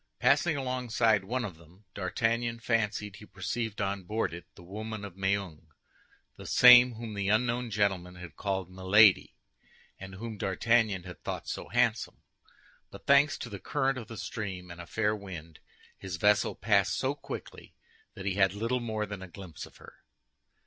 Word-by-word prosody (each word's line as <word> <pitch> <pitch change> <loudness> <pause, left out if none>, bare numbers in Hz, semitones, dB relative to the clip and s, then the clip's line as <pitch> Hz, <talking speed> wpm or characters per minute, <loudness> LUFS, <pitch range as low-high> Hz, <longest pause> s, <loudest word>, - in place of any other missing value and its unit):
Passing 160 -4 +3
alongside 120 -6 +1
one 120 +4 -2
of 95 -6 -8
them, 85 +5 -20
D'Artagnan 115 +4 -1
fancied 105 -3 -1
he 105 - -13
perceived 105 +3 -4
on 100 0 -1
board 105 +1 -2
it 85 -2 -9
the - - -14
woman 105 +3 -6
of 95 -3 -10
Meung—the 95 -6 -6
same 125 0 +8
whom 115 -1 -7
the 100 -1 -2
unknown 120 +2 +1
gentleman 95 -4 0
had 90 -1 -10
called 95 -2 -3
Milady, 95 +2 +4 0.6
and 95 0 -9
whom 110 +1 -7
D'Artagnan 105 0 +1
had 90 -3 -11
thought - - -5
so - - -5
handsome; 120 -2 0 0.7
but - - -13
thanks 140 +1 +5
to - - -6
the 100 -3 -7
current 135 +1 0
of 115 - -9
the 115 - -9
stream 95 -6 -5
and 85 0 -8
a 85 - -11
fair 105 +1 0
wind, 85 -6 -9 0.4
his 95 -3 -5
vessel 105 +2 +3
passed 100 -2 +2
so 130 +1 0
quickly 145 - -9 0.4
that 95 - -8
he 100 - 0
had 95 0 +2
little 115 +4 -1
more 110 -3 -2
than 100 -2 -7
a 95 - -8
glimpse 90 -2 -9
of - - -19
her. - - -15
105 Hz, 170 wpm, -29 LUFS, 95-115 Hz, 0.7 s, same